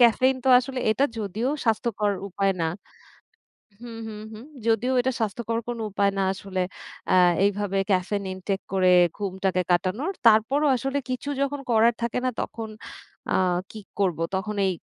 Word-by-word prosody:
Caffeine 255 Hz, +3 st, +5 dB
তো 265 Hz, -, +2 dB
আসলে 255 Hz, +1 st, -4 dB
এটা 265 Hz, +6 st, +2 dB
যদিও 215 Hz, +4 st, -2 dB, 0.2 s
স্বাস্থ্যকর 220 Hz, -2 st, +1 dB, 0.2 s
উপায় 195 Hz, +1 st, +1 dB
না 165 Hz, -, +1 dB, 1.1 s
হুম, 230 Hz, -2 st, -8 dB
হুম, 210 Hz, -1 st, -7 dB
হুম, 220 Hz, +4 st, -10 dB, 0.2 s
যদিও 230 Hz, +3 st, +2 dB
এটা 260 Hz, -, 0 dB
স্বাস্থ্যকর 230 Hz, +1 st, -1 dB
কোনো 235 Hz, -2 st, -4 dB
উপায় 200 Hz, 0 st, +2 dB
না 195 Hz, -, +2 dB
আসলে 190 Hz, -1 st, -4 dB, 0.5 s
অ্যা 185 Hz, -, +5 dB, 0.3 s
এইভাবে 200 Hz, -1 st, 0 dB
ক্যাফেইন 195 Hz, +2 st, 0 dB
ইনটেক 190 Hz, +1 st, -3 dB
করে 185 Hz, -1 st, +4 dB, 0.3 s
ঘুমটাকে 190 Hz, -2 st, -1 dB
কাটানোর। 190 Hz, -, +1 dB, 0.2 s
তারপরও 235 Hz, +7 st, +4 dB
আসলে 270 Hz, +3 st, -2 dB
কিছু 255 Hz, +3 st, -3 dB
যখন 280 Hz, 0 st, -1 dB
করার 230 Hz, +1 st, +5 dB
থাকে 235 Hz, +1 st, -1 dB
না -, -, +3 dB
তখন 225 Hz, -1 st, -5 dB, 0.6 s
আ -, -, +2 dB, 0.4 s
কি 220 Hz, -, -8 dB, 0.2 s
করব? 185 Hz, -5 st, +1 dB, 0.2 s
তখন 210 Hz, +3 st, -3 dB
এই 190 Hz, -, +1 dB
215 Hz, 155 wpm, -25 LUFS, 195-240 Hz, 1.1 s, ক্যাফেইন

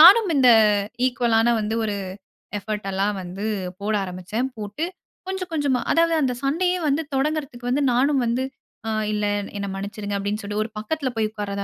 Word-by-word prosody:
நானும் 385 Hz, +4 st, +9 dB
இந்த 255 Hz, -2 st, +6 dB, 0.6 s
ஈக்குவலான 235 Hz, -2 st, +2 dB
வந்து 215 Hz, +1 st, -1 dB
ஒரு 210 Hz, -, -1 dB, 0.6 s
எஃபர்ட் 210 Hz, 0 st, -4 dB
எல்லாம் 195 Hz, +2 st, +1 dB
வந்து 185 Hz, +3 st, -6 dB, 0.4 s
போட 210 Hz, +2 st, -1 dB
ஆரம்பிச்சேன். 190 Hz, +7 st, -3 dB
போட்டு 210 Hz, +9 st, -3 dB, 0.4 s
கொஞ்சம், 380 Hz, -1 st, -3 dB
கொஞ்சமா 285 Hz, -5 st, +2 dB
அதாவது 335 Hz, 0 st, +4 dB
அந்த 260 Hz, -3 st, +2 dB
சண்டையே 355 Hz, +6 st, +2 dB
வந்து 285 Hz, +3 st, +2 dB
தொடங்குறதுக்கு 275 Hz, -3 st, -1 dB
வந்து 280 Hz, +3 st, +2 dB
நானும் 270 Hz, +2 st, +3 dB
வந்து 240 Hz, +3 st, +1 dB, 0.4 s
அ -, -, 0 dB, 0.2 s
இல்ல 210 Hz, 0 st, 0 dB, 0.3 s
என்ன 200 Hz, 0 st, -3 dB
மன்னிச்சிடுங்க 205 Hz, +1 st, -4 dB
அப்பிடின்னு 205 Hz, +2 st, -2 dB
சொல்லி 205 Hz, +1 st, -4 dB
ஒரு 220 Hz, -, -6 dB
பக்கத்தில 265 Hz, +5 st, -2 dB
போய் 220 Hz, -1 st, +1 dB
உட்கார்றதா 200 Hz, -2 st, -3 dB
230 Hz, 160 wpm, -23 LUFS, 205-285 Hz, 0.6 s, நானும்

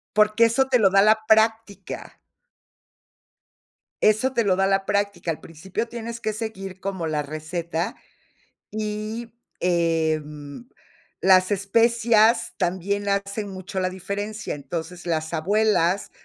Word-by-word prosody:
Porque 215 Hz, +2 st, +5 dB
eso 230 Hz, +4 st, +2 dB
te 250 Hz, -2 st, +4 dB
lo 200 Hz, -3 st, +5 dB
da 195 Hz, +1 st, +5 dB
la 220 Hz, +1 st, +4 dB
práctica. 220 Hz, -1 st, +1 dB, 1.8 s
Eso 215 Hz, +5 st, +3 dB
te 235 Hz, -, +2 dB
lo 190 Hz, -3 st, +2 dB
da 195 Hz, 0 st, +2 dB
la 195 Hz, 0 st, +1 dB
práctica. 200 Hz, -4 st, -1 dB
Al 155 Hz, -, -5 dB
principio 180 Hz, +8 st, -5 dB
tienes 235 Hz, 0 st, -6 dB
que 220 Hz, -1 st, -2 dB
seguir 195 Hz, -4 st, -6 dB
como 190 Hz, -4 st, -3 dB
la 150 Hz, -1 st, -1 dB
receta 160 Hz, +3 st, -4 dB, 0.8 s
y, 215 Hz, +2 st, -4 dB, 0.3 s
em, 160 Hz, 0 st, -1 dB, 0.5 s
las 185 Hz, 0 st, +5 dB
especias 225 Hz, +3 st, +3 dB
también 190 Hz, +3 st, -1 dB
hacen 200 Hz, +1 st, -2 dB
mucho 190 Hz, 0 st, -5 dB
la 185 Hz, 0 st, 0 dB
diferencia, 205 Hz, +3 st, -4 dB
entonces, 170 Hz, +4 st, -6 dB
las 160 Hz, -1 st, -1 dB
abuelas 195 Hz, +1 st, +1 dB
195 Hz, 120 wpm, -24 LUFS, 175-220 Hz, 1.8 s, Porque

